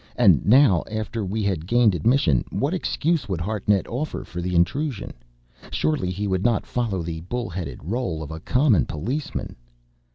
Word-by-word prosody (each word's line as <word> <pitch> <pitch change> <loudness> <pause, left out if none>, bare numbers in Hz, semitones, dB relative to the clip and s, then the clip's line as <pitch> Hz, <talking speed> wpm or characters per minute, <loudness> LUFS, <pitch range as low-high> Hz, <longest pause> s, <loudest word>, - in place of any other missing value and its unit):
And - - +5
now, 120 - +6
after 110 +1 -3
we 105 +3 -2
had 90 -5 -1
gained 120 -2 +4
admission, 90 - +2
what 145 +6 -1
excuse 165 - 0
would 95 -3 -1
Hartnett 100 +1 0
offer 140 +6 -4
for 90 - -6
the 90 0 -2
intrusion? 130 - 0 0.6
Surely 150 -13 0
he 95 +3 -3
would 95 -1 0
not 115 -3 +2
follow 110 -8 -2
the 80 -1 -4
bull 120 +3 -4
headed 85 0 -5
rôle 90 - -3
of 75 - -8
a 80 - -6
common 125 - +2
policeman! 120 - -4
105 Hz, 165 wpm, -24 LUFS, 90-125 Hz, 0.6 s, now